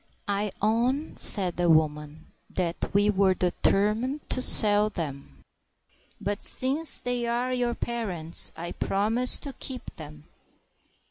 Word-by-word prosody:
"I 205 0 -3
own," 245 +8 -2
said 185 -5 +5
the 175 -1 -1
woman, 155 0 -2 0.2
"that 175 -2 -5
we 205 +1 +1
were 190 -1 0
determined 210 +9 -2
to 255 - -1
sell 210 -3 +3
them; 140 - -9 0.8
but 205 +1 -5
since 285 +5 +5
they 245 -1 -4
are 245 +2 -3
your 245 -1 -3
parents, 190 -9 0
I 170 +1 -8
promise 225 +6 0
to 280 - -9
keep 260 -1 -10
them." 150 -1 -13
205 Hz, 125 wpm, -24 LUFS, 170-245 Hz, 0.8 s, said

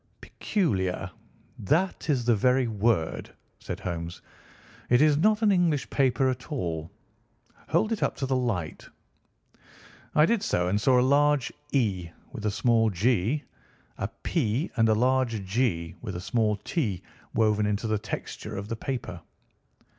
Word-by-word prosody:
"Peculiar—that 115 - -2
is 130 -5 +1
the 120 -1 +4
very 125 +4 +3
word," 110 -6 0 0.3
said - - -6
Holmes. 85 -1 -4 0.7
"It 120 - +5
is 150 0 +5
not 215 +8 +2
an 210 - +5
English 170 -7 +2
paper 135 -1 +2
at 125 +3 -5
all. 85 - -3 0.8
Hold 220 - +2
it 225 - -1
up - - 0
to 135 - -3
the 130 0 0
light." 105 -11 -2 1.3
I 150 - +6
did 230 +2 +1
so, 90 - 0
and 105 +3 0
saw 130 0 +4
a - - +4
large 145 -1 +3 0.2
"E" 100 -10 0 0.2
with 110 -5 -4
a - - +3
small 115 +1 +2
"g," 115 - +1 0.6
a - - -1 0.2
"P," 135 0 0
and 115 -2 +3
a 110 - +4
large 125 -3 +1
"G" 95 -6 0
with 100 -6 -5
a - - -3
small 110 +2 +1
"t" 100 - -2 0.3
woven 105 -1 +2
into 105 +2 -1
the 110 -1 0
texture 105 0 -6
of 100 +2 -6
the 115 - -2
paper. 115 -8 -5
115 Hz, 150 wpm, -27 LUFS, 100-135 Hz, 1.3 s, I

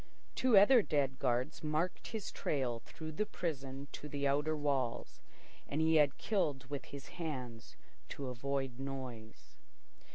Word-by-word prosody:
Two 255 -5 +5
other 225 +5 +8
dead 140 -7 0
guards 130 +4 0
marked 155 +4 -1
his 220 -3 -4
trail 125 -5 -1
through 160 +6 -8
the 210 +7 0
prison 140 -4 -4
to 150 - -7
the 140 0 0
outer 150 +3 +2
walls, 140 -5 -1 0.5
and 145 - -2
he 160 0 +5
had 145 -2 +4
killed 150 - 0
with 140 - -3
his 140 -1 -9
hands 130 -9 -6 0.3
to 140 - -5
avoid 130 0 -2
noise. 130 -5 -7
140 Hz, 140 wpm, -35 LUFS, 130-155 Hz, 0.5 s, other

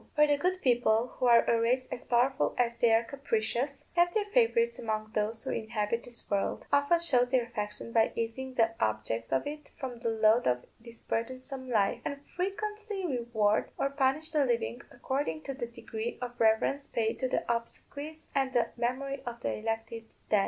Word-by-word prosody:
For 300 0 +6
the 290 -1 +3
good 365 +5 -1
people, 240 -2 +3
who 250 - +3
are 235 -1 +7
a 230 -1 +2
race 255 +3 +1
as - - -5
powerful 250 +3 +2
as 235 -1 +2
they 235 - +4
are 225 +1 +5
capricious, 270 +2 -2
have 350 0 +4
their 425 -2 +2
favourites 470 0 +3
among 215 -1 -3
those 215 +2 0
who - - -2
inhabit 220 +1 -1
this 240 -1 -8
world; 200 -1 0
often 285 +4 +4
show 260 -8 +4
their 250 0 +2
affection 210 -1 -5
by 225 -1 +3
easing 255 +3 -3
the 225 -1 +3
objects 110 +2 -1
of 135 - +1
it 300 0 -6
from 255 -3 -5
the 230 -1 -1
load 220 +1 +4
of 125 0 +1
this 230 0 -13
burdensome 255 +3 -4
life; 210 -5 +2
and 285 0 -5
frequently 415 +1 -3
reward 235 -7 +1
or 275 - 0
punish 280 +3 +1
the 300 -2 +3
living 240 -1 -1
according 240 - -2
to 275 - -4
the 250 -3 -4
degree 230 -1 -5
of 245 -1 -6
reverence 225 +5 +2
paid 225 -1 -1
to 260 - +1
the 255 - 0
obsequies 285 +6 -4
and 270 -2 +1
the 240 - +2
memory 260 +3 -2
of 235 -1 -5
the - - -1
elected 225 +1 -3 0.3
dead. 210 - +5
240 Hz, 190 wpm, -30 LUFS, 225-280 Hz, 0.3 s, are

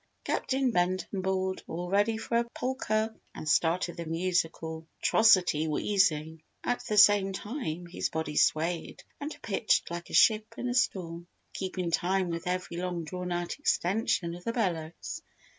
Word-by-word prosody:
Captain 265 -1 0
Benton 185 0 0
bawled, 190 0 -1
"All 175 +2 -4
ready 205 +4 +2
for 235 +1 -1
a - - +2
polker," 225 -4 -1 0.2
and 155 - -7
started 170 +3 +2
the 170 - -4
musical 165 -1 -1
atrocity 185 -8 +4
wheezing. 160 -2 +1 0.2
At 245 - -1
the 210 - 0
same 205 -1 +6
time 190 - -4
his 175 - -3
body 160 -1 -3
swayed 165 +3 +1 0.2
and 290 +2 -4
pitched 210 -3 +1
like 170 0 -5
a - - -10
ship 215 -1 +4
in 250 - -3
a 245 - -1
storm, 175 -8 -1 0.3
keeping 185 -2 -3
time 185 +1 +1
with 170 +2 -4
every 180 -1 -2
long 175 -1 -2
drawn 180 +3 -5
out 175 +7 -3
extension 185 - +1
of 175 +1 -9
the 230 - -2
bellows. 170 -8 -3
180 Hz, 155 wpm, -29 LUFS, 170-210 Hz, 0.3 s, same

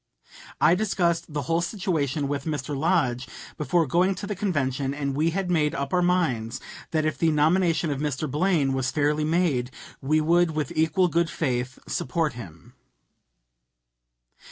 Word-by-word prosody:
I 165 - +5
discussed 175 -4 0
the 145 -1 -2
whole 165 +6 0
situation 160 - -1
with 140 -1 -3
Mr. 150 -2 -3
Lodge 135 -5 +1 0.3
before 160 +3 +1
going 180 +7 +2
to 185 - -6
the 205 0 -3
convention, 140 -8 -1
and 140 -1 -2
we 155 +4 +1
had 180 +1 -2
made 155 -2 +1
up 140 +1 -3
our 180 - +3
minds 155 -11 0 0.3
that 155 -3 0
if 155 - -1
the 165 - +3
nomination 160 +1 +2
of 140 - -2
Mr. 150 0 -2
Blaine 150 -2 +1
was 130 -1 0
fairly 150 0 +1
made 155 -7 +1 0.3
we 155 +3 +2
would 165 +1 +2
with 150 -4 -2
equal 160 +4 +2
good 170 0 +1
faith 125 -3 -2
support 155 +4 -1
him. 85 - -11
155 Hz, 155 wpm, -25 LUFS, 140-170 Hz, 0.3 s, I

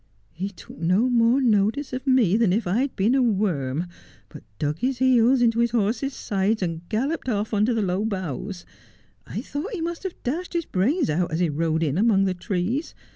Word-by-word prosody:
He 190 +5 -4
took 190 - -14
no 185 +10 +2
more 235 +2 +4
notice 240 +3 +1
of 255 +2 -5
me 245 -8 +4
than 225 -4 +3
if 215 +5 0
I 185 +6 +1
had 270 +1 -1
been 210 +6 +2
a 270 - +3
worm, 180 - 0 0.4
but - - -11 0.2
dug 150 +1 -2
his 255 0 0
heels 255 -1 +4
into 230 -1 +2
his 235 0 +3
horse's 240 +5 -1
sides 200 +1 0
and 165 -2 -3
galloped 265 +6 -1
off 215 -1 -1
under 210 +3 +2
the 220 - +1
low 185 +2 0
boughs. 185 - -4 0.6
I - - -4
thought 310 +11 -5
he 390 - -3
must 335 +1 -3
have 380 -2 -5
dashed 335 +10 -3
his 340 -2 -1
brains 220 - +1
out 175 +3 0
as 160 - -1
he 175 -2 +2
rode 160 +2 0
in 155 +2 0
among 210 -3 +4
the 190 - +1
trees. 195 - -2
215 Hz, 205 wpm, -24 LUFS, 180-255 Hz, 0.6 s, more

